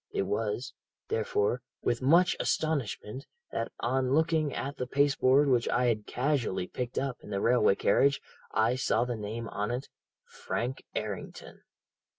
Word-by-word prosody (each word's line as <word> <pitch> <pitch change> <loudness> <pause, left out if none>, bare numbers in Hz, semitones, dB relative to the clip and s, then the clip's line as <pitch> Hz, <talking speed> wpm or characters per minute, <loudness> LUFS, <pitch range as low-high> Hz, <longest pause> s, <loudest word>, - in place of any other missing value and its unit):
It - - 0
was, 110 +5 -2 0.4
therefore, 110 +2 0 0.2
with 120 - 0
much 170 +7 +5
astonishment 135 -3 -2 0.2
that 115 - -3
on 130 +2 +1
looking 160 -2 +2
at 140 +2 -4
the 125 - -3
paste 140 +1 +2
board 135 +3 +5
which 125 -3 +2
I 125 - +2
had 110 -3 0
casually 125 -9 0
picked 125 +5 -5
up 135 -2 -1
in - - -12
the 100 - -1
railway 120 -3 +4
carriage 140 +6 +3 0.3
I 110 +3 +2
saw 120 -2 +1
the 120 -1 -2
name 110 +2 -5
on 105 +1 -2
it, 125 +3 -3 0.4
"Frank 125 +3 -4
Errington."' 105 -3 -6
125 Hz, 155 wpm, -30 LUFS, 115-140 Hz, 0.4 s, much